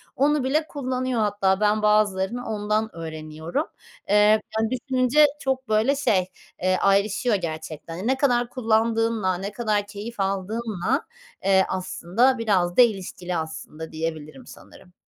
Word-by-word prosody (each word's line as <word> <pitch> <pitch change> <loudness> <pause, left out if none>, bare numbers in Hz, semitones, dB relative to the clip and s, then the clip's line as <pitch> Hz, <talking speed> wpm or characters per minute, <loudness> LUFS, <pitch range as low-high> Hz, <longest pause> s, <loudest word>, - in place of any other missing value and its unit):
onu 290 +1 +2
bile 305 +4 +1
kullanıyor 255 -4 -2
hatta. 200 -2 +1
Ben 210 0 +2
bazılarını 210 +2 +1
ondan 215 0 -1
öğreniyorum. 160 - -4 0.4
Eee, 205 - +3 0.4
yani 220 0 +1
düşününce 255 +3 +3
çok 265 -2 -2
böyle 220 +6 +3
şey, 205 -10 +2 0.4
eee, 185 +1 +2
ayrışıyor 200 +4 +2
gerçekten. 165 +1 -5
Ne 265 +1 +2
kadar 245 -3 +2
kullandığınla, 225 -4 +1
ne 195 +3 -5
kadar 210 -2 -1
keyif 210 +2 -8
aldığınla, 205 - -1 0.4
eee, 190 0 +4
aslında 190 +7 +1
biraz 190 -6 +1
da - - +9
ilişkili 185 -5 0
aslında 160 0 -6
diyebilirim 155 -4 -5
sanırım. 180 - -15
210 Hz, 125 wpm, -24 LUFS, 185-240 Hz, 0.4 s, da